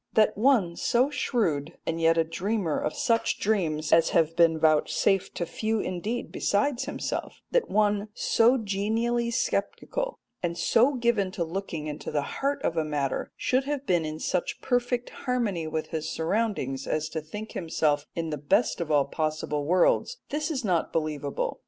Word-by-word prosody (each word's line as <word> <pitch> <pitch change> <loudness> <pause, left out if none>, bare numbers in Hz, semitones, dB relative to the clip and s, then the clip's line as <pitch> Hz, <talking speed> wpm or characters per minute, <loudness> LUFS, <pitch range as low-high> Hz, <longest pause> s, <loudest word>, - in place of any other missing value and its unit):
That 215 -1 +4
one 215 -7 +3
so 255 +4 +2
shrewd, 165 - -1
and 165 0 -2
yet 165 0 +4
a 165 - +4
dreamer 175 +1 -1
of 155 - -2
such 230 -1 +1
dreams 165 -8 0
as 165 0 +5
have 165 0 +2
been 165 -1 +4
vouchsafed 160 +5 +2
to 170 - -1
few 220 +5 -1
indeed 205 +6 -3
besides 240 +6 0
himself - - -4
that - - +2
one 205 0 +2
so 235 +3 +4
genially 225 +3 0
sceptical, - - -2 0.2
and 170 -1 -2
so 245 +9 +3
given 235 -5 +1
to 185 -5 -1
looking 165 -2 -4
into 150 0 -5
the 145 - 0 0.2
heart 280 0 0
of 165 - -1
a 160 - +2
matter, 145 -3 -2
should 260 +1 +1
have 285 -1 -3
been 175 -6 +2
in 155 0 -4
such 180 +1 -1
perfect 245 -1 0
harmony 225 - -1
with 155 0 -3
his 160 -1 -3
surroundings 160 - -1
as 155 0 -1
to 160 - -3
think 210 +8 -7
himself 155 -3 0
in 165 -1 -2
the 150 - -3
best 150 - +1
of 165 - -3
all 145 -2 +4
possible 155 -2 -2
worlds 185 - +3
this 300 +2 -1
is 270 -7 -2
not 175 -4 +1
believable. 150 -3 -2
180 Hz, 170 wpm, -27 LUFS, 160-235 Hz, 0.2 s, as